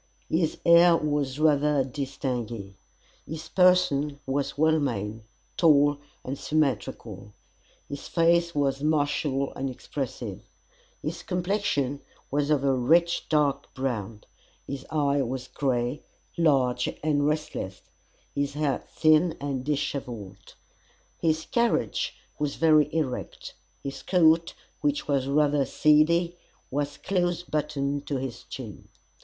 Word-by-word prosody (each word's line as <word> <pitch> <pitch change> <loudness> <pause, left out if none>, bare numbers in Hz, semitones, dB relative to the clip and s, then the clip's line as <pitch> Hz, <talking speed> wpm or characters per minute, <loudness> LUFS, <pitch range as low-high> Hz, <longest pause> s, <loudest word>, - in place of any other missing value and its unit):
His 160 -1 +1
air 170 0 +7
was 145 -3 -1
rather 150 -2 +3
distingué. 125 -6 -4 0.5
His 160 0 -8
person 165 -6 +3
was 140 +1 -2
well 160 +1 +4
made, 110 -5 -2 0.4
tall 145 -3 +4 0.3
and 135 +2 -4
symmetrical. 115 -8 -2 0.5
His 140 0 -7
face 170 0 +2
was 140 -1 0
martial 145 -2 0
and 135 0 -3
expressive. 130 +1 -5 0.6
His - - -4
complexion 180 -7 -1 0.3
was 145 +1 0
of 145 -3 +2
a 135 -1 +3
rich 165 +7 +2
dark 145 -3 +1
brown; 115 -5 -3 0.4
his 140 -1 -6
eye 145 -2 +1
was 130 0 -3
grey, 125 -1 -1 0.3
large, 130 -6 +2
and 145 -2 +2
restless 150 -11 -3 0.5
his 140 0 -2
hair 150 -2 0
thin, 155 +2 +3
and 140 -3 -3
dishevelled. 125 -9 -4 0.6
His 160 -1 +1
carriage 235 - 0 0.2
was 150 -1 -1
very 155 -2 +4
erect; 150 -6 -3 0.3
his 140 0 -5
coat, 165 -2 +3 0.2
which 295 0 -1
was 135 -2 +1
rather 145 0 +3
seedy, 170 +5 +3 0.3
was 145 +1 -2
close 175 -2 -1
buttoned 145 -3 -2
to 140 - -1
his 130 -2 -6
chin. - - -9
145 Hz, 115 wpm, -26 LUFS, 135-160 Hz, 0.6 s, air